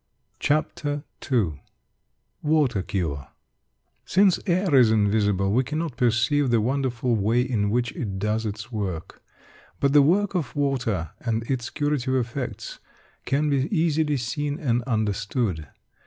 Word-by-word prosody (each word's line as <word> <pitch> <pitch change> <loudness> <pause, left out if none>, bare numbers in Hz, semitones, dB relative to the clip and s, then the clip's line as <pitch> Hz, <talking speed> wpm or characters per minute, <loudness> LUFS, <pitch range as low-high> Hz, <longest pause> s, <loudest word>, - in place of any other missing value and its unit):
CHAPTER 145 -1 -1 0.3
II 90 - +1 0.8
WATER 150 -9 +2
CURE 80 -8 -3 0.8
Since 190 -1 +3
air 185 -1 +1
is 125 -4 +6
invisible, 105 -2 +2
we 125 +5 +3
cannot 155 0 -3
perceive 125 +4 +2
the 120 -1 +3
wonderful 125 0 0
way 110 +4 +2
in 110 -6 0
which 120 +2 0
it 110 - -4
does 105 +3 -1
its 105 +3 -6
work. 95 -5 -4 0.6
But 140 0 +2
the 145 - +8
work 195 +8 +2
of 165 -9 -2
water 125 - -1
and 115 -2 -1
its 120 0 -2
curative 145 -3 -1
effects 125 +1 -4 0.5
can 145 +2 +1
be 135 0 +1
easily 160 -5 +1
seen 145 +5 -3
and 125 -7 +1
understood. 105 - -1
125 Hz, 130 wpm, -25 LUFS, 105-145 Hz, 0.8 s, the